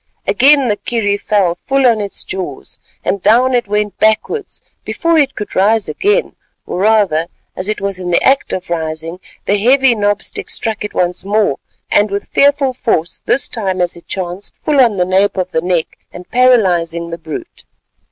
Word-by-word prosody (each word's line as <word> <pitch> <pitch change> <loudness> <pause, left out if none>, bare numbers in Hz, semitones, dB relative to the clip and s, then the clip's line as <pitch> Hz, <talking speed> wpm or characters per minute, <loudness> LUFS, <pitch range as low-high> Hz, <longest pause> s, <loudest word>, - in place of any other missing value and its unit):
Again 280 -1 +4
the 210 -2 0
kerry 210 -4 -1
fell 195 -4 0
full 270 0 +2
on 230 -3 +3
its 200 -1 -4
jaws, 145 -8 -6 0.3
and 200 - -1
down 240 +6 +4
it 240 -3 +1
went 210 0 -2
backwards. 220 - 0 0.2
Before 335 -1 0
it 280 -2 +1
could 210 -2 -6
rise 210 +3 +3
again, 415 - 0 0.3
or - - -4
rather 200 -6 +2 0.3
as 185 +2 -5
it 215 - -2
was 195 -1 -3
in 180 -1 -4
the 175 - +2
act 270 +1 +2
of 180 -2 -5
rising, 160 +1 -4 0.3
the 205 +1 +1
heavy 260 +3 +4
knob 205 -1 0
stick - - -5
struck 220 -2 -2
it 210 - -6
once 180 0 0
more, 205 -7 +1 0.3
and 205 +1 +3
with 200 +1 -4
fearful 280 -2 +3
force, 215 -10 -1
this 270 - +2
time 190 -5 -2
as 175 -1 0
it 170 - -15
chanced, 185 0 -5
full 295 -2 0
on 230 -5 +3
the 180 - +2
nape 190 +2 +1
of 185 0 -2
the 160 - 0
neck, 175 -2 -2
and 180 0 -12
paralysing 175 -10 +2
the 170 - -6
brute. 160 -1 -8
205 Hz, 185 wpm, -15 LUFS, 180-240 Hz, 0.3 s, Again